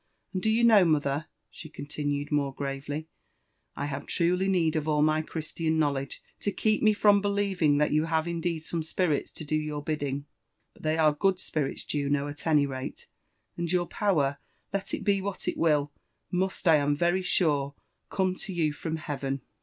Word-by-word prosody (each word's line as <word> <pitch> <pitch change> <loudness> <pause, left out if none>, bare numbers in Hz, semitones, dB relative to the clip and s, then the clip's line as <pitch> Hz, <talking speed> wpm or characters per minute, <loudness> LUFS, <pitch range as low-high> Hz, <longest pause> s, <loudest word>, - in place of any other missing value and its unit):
— - - -48
And, 185 - -1
do 220 - +1
you 225 +2 +3
know, 220 -4 +7
mother," 150 -2 +1 0.2
she 160 - -10
continued 145 -1 -3
more 140 -2 0
gravely, 145 +2 -4 0.7
I 140 - -3
have 140 -1 -5
truly 180 +2 +1
need 170 -5 +2
of 155 -1 -1
all 150 -1 +3
my 155 0 +3
Christian 160 0 -2
knowlege 140 -3 -1 0.2
to 205 - -1
keep 215 +1 +1
me 215 - +6
from 205 -1 +4
believing 195 -7 +2
that 150 0 +2
you 155 +1 +2
have 160 0 0
indeed 170 -1 -2
some 165 0 -2
spirits 160 -1 0
to 155 - -8
do 155 - -1
your 150 -1 -2
bidding; 145 -2 -2 0.3
— - - -49
^but - - -17
they 155 +1 0
are 155 -2 +4
good 185 +4 +1
spirits, 150 -6 -2
Juno, 145 -1 0
at 145 +3 -7
any 150 -3 +4
rate, 130 -1 -6 0.5
and 170 -1 -2
your 180 -1 +2
power, 150 -9 +1 0.3
let 200 -1 -2
it - - -7
be 200 -2 +2
what 200 0 -5
it - - 0
will, 150 -3 +2 0.4
must, 185 0 -1
I 160 -2 +7
am 145 0 +1
very 175 +4 +2
sure, 145 -6 +1 0.3
come 190 -1 +1
to 195 - -5
you 160 -4 +1
from 160 +2 -4
Heaven." 140 -4 -3
155 Hz, 195 wpm, -28 LUFS, 145-180 Hz, 0.7 s, know